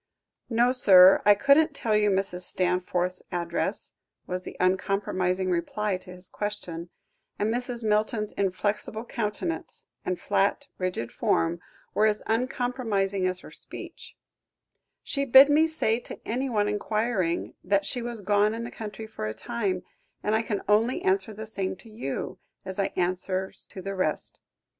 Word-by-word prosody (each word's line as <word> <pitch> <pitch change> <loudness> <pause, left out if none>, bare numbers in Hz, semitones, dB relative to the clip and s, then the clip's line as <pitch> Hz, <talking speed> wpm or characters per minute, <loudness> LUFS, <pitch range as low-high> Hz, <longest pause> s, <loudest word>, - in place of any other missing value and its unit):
"No, 240 +1 +3
sir, 190 -7 +7
I 205 - +8
couldn't 280 +6 +4
tell 220 -5 +1
you 210 0 +4
Mrs. 190 -2 0
Stanforth's 180 0 0
address," 170 -1 -2 0.3
was 180 0 -3
the - - -9
uncompromising 185 0 +1
reply 185 +3 -1
to 185 - -15
his 180 0 -5
question, 180 -5 -5 0.5
and 215 +2 0
Mrs. 245 -2 -2
Milton's 215 0 +1
inflexible 205 +3 -1
countenance, 230 +9 -3 0.2
and 180 -1 -2
flat, 200 +8 +1
rigid 180 -11 -2
form 165 +1 +1 0.3
were 215 - +4
as 210 0 0
uncompromising 225 -6 0
as 185 0 -3
her - - -12
speech; - - -10 0.9
"she 280 - -1
bid 270 +2 +8
me 315 +2 +5
say 235 -8 0
to - - -9
anyone 230 -3 0
enquiring, 210 -4 -1
that 200 +1 +2
she 245 - -2
was 235 -2 -5
gone 205 +2 +2
in 230 - -4
the 235 - -6
country 215 0 -7
for 215 - -5
a 110 - -4
time, 195 -6 -2 0.4
and 210 - +1
I 220 - +3
can 210 -3 -3
only 230 - +2
answer 385 - +1
the 215 +1 -7
same 195 -4 -3
to 225 - -15
you, 215 - -4 0.3
as 190 +1 -5
I 195 - +1
answers 185 +1 -2
to 190 - -9
the 195 - -3
rest. 185 -5 -2
205 Hz, 150 wpm, -27 LUFS, 185-230 Hz, 0.9 s, I